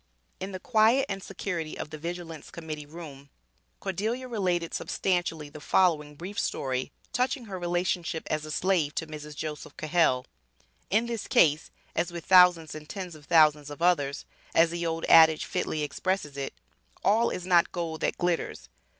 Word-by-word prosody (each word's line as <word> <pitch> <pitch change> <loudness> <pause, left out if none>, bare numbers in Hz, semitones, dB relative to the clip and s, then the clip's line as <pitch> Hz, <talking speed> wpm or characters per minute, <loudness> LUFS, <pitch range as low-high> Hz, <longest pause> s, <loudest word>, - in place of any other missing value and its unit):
In 190 +1 -5
the 185 - -5
quiet 225 +5 +4
and 195 -1 -3
security 175 -5 -4
of - - -6
the 155 - -6
Vigilance 165 -1 -6
Committee 155 -3 -7
Room, 145 -3 -10 0.5
Cordelia 220 +7 -2
related 180 -7 -1
substantially 175 -5 -1
the 150 +1 -11
following 150 -6 +2
brief 185 +7 -6
story 130 -1 -2 0.2
touching 250 0 0
her 190 -3 -6
relationship 175 -2 -1
as 155 0 -2
a 155 - -7
slave 165 -2 +1
to 160 - -1
Mrs. 150 -1 -8
Joseph 150 0 -6
Cahell. 155 -6 +2 0.6
In 220 +4 +2
this 235 -2 -4
case, 155 -1 +4 0.3
as 175 +2 0
with 170 -1 -7
thousands 180 -4 +6
and 155 0 -9
tens 185 -4 -6
of 150 -2 -14
thousands 150 -2 +4
of 145 +3 -6
others, 145 -6 +2 0.3
as 165 0 +5
the 170 0 -2
old 165 0 -2
adage 160 -1 +7
fitly 155 - -2
expresses 170 -1 -2
it, 140 -1 -4 0.5
"All 225 +3 +4
is 180 - -5
not 175 -2 +4
gold 165 -3 -4
that - - 0
glitters." 175 -1 -2
170 Hz, 165 wpm, -28 LUFS, 155-185 Hz, 0.6 s, adage